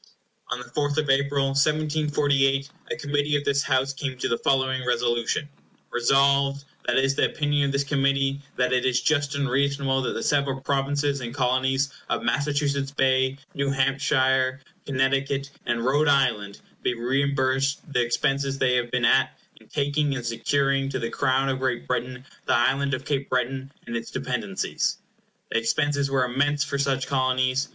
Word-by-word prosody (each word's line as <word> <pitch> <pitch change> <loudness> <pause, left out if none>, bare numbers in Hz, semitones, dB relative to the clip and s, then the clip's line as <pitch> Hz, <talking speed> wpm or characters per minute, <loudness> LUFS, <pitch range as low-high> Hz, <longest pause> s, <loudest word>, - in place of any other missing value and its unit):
On 120 - 0
the 125 - -8
4th 145 -1 -2
of 150 -3 +2
April, 140 0 +2
1748, 145 -1 +1 0.2
a - - -2
Committee 145 0 0
of 145 - 0
this 140 0 +2
House 135 +1 +1
came 135 -1 -4
to - - -1
the 115 - +1
following 130 -1 +1
resolution: 120 +2 0 0.4
"Resolved: 140 +2 +2 0.2
That 120 - +2
it 135 - +4
is 135 - +1
the - - +2
opinion 145 -1 0
of - - -1
this 140 0 +1
Committee 140 0 +1
that 125 0 +1
it 125 - +2
is 125 -2 +2
just 145 +2 +1
and 140 -1 0
reasonable 135 0 +1
that 125 - -2
the - - -4
several 140 -2 +1
Provinces 140 +1 0
and 120 +1 -6
Colonies 130 +1 +1 0.2
of - - -1
Massachusetts 140 +2 0
Bay, 130 -1 +1 0.2
New 140 0 -1
Hampshire, 130 -1 +1 0.3
Connecticut, 135 0 0 0.2
and 120 0 0
Rhode 145 +4 +2
Island, 115 -8 +1 0.2
be 125 - 0
reimbursed 135 +2 0
the 125 - +3
expenses 135 +3 0
they 130 -2 +2
have 120 -1 -1
been 125 0 +1
at - - +3 0.2
in - - -21
taking 145 0 0
and 120 -2 -5
securing 135 +3 0
to 130 - -2
the 115 -2 -3
Crown 130 +1 +1
of 130 -1 -1
Great 125 - -1
Britain 125 - -3 0.2
the - - +3
Island 135 +3 +2
of 130 +1 -8
Cape 140 -2 -2
Breton 130 +2 -2
and 115 - -5
its 115 - -4
dependencies." - - -2 0.5
The - - +2
expenses 140 +4 0
were 135 -2 +2
immense 140 +3 +1
for 140 0 -3
such 135 -1 0
Colonies. 130 0 +1
135 Hz, 170 wpm, -25 LUFS, 130-140 Hz, 0.5 s, it